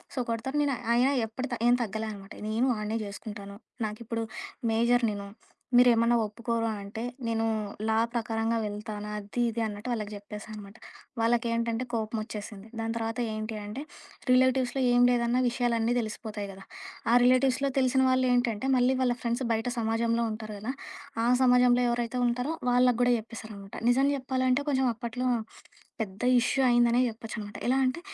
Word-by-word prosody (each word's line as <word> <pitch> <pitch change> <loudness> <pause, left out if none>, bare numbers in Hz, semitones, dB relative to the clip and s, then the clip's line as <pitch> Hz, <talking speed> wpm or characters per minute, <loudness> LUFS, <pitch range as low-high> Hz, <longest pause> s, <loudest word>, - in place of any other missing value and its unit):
So 260 - -1
కొడతారు, 235 +5 -2
నేను 280 -2 +1 0.2
ఆయిన 250 +3 +4 0.2
ఎప్పటి 255 +5 -5
త - - -6
ఏం 245 - +6
తగ్గలే 220 +1 -3
అనమాట. 195 -1 -12 0.2
నేను 225 +4 +1
వాడ్నే 215 +1 -2
చేస్కుంటాను. 200 0 -8 0.3
నాకిప్పుడు 230 +1 -4 0.5
మేజర్ 235 +2 +3
నేను. 200 -1 -6 0.5
మీరేమన్నా 240 -1 +5
ఒప్పుకోరు 230 +2 -2
అంటే 200 +3 -7 0.3
నేను 225 0 0 0.4
లా 220 - +2 0.2
ప్రకారంగా 225 -1 -1
వెళ్తాను 210 0 -5
అది 210 +3 -3
ఇది 230 +1 -3
అన్నట్టు 210 +2 -5
వాళ్ళకి 215 -3 -3
జెప్పేసానమాట. 210 0 -9 0.4
వాళ్ళకేంటంటే 230 0 +1
కోపమొచ్చేసింది. 215 -2 -4
దాని 225 0 -2
తర్వాత 225 +1 -3
ఏంటి 215 +1 -4
అంటే 210 +7 -6 0.5
రిలేటివ్స్‌లో 260 +1 +3
ఏం 245 0 +5
లేదన్న 240 0 +2
విషయాలన్నీ 235 -1 +1
ధెలిసిపోతాయి 215 -2 -5
కదా! 195 0 -12 0.5
ఆ - - +5
రిలేటివ్స్‌లో 255 +2 +3
తెలిసిన 260 0 +3
వాళ్ళు 255 0 +3
ఏంటంటే 240 -1 0
మళ్ళీ 255 +1 +3
వాళ్ళ 245 -1 +2
ఫ్రెండ్స్ 235 +2 -1
బయట 225 +1 0
సమాజంలో 230 +1 +1
ఉంటారు 215 -1 -6
గదా! 230 +5 -3 0.5
ఆ - - +2
సమాజంలో 250 -1 +5
ఎవరైతే 240 +1 -1
ఉంటారో 250 +6 -1 0.2
వాళ్ళగూడా 245 0 +4
జెప్పేసారనమాట. 220 -3 -9 0.2
నిజం 270 +3 +3
చెప్పాలంటే 260 0 0
కొంచెం 265 -2 +2
అప్పట్లో 240 +2 -3 0.7
పెద్ద 200 0 -5 0.2
ఇష్యూ 265 +3 +1
అయిందనే 240 0 +4
జెప్పొచ్చనమాట. 220 -2 -7
ఎలా 265 - +3
అంటే 255 +6 -2
230 Hz, 145 wpm, -28 LUFS, 215-245 Hz, 0.7 s, ఏం